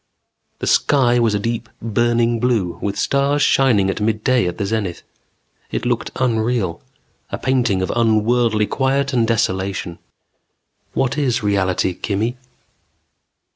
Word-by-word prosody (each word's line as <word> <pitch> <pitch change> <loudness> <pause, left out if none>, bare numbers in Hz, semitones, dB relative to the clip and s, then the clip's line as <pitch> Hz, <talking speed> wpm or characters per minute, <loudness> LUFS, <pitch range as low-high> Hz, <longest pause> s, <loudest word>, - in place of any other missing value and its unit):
The - - -5
sky 125 -4 +3
was 115 -3 +2
a - - 0
deep, 115 +2 -3
burning 120 +1 +1
blue 110 -8 0
with 100 -1 -2
stars 140 +1 +1
shining 120 -10 +3
at 95 - -2
midday 110 +1 +1
at 90 - -4
the 100 - -2
zenith. 100 -4 -3 0.7
It - - -3
looked - - -1
unreal, 115 -7 0 0.5
a - - -4
painting 120 -8 +1
of - - -2
unworldly 115 -1 +2
quiet 135 +3 0
and 115 -3 +2
desolation. 95 -6 -1 1.0
_What 135 +2 0
is 125 -5 0
reality, 95 -2 +1
Kimmy? 110 +6 -2
115 Hz, 130 wpm, -19 LUFS, 100-125 Hz, 1.0 s, sky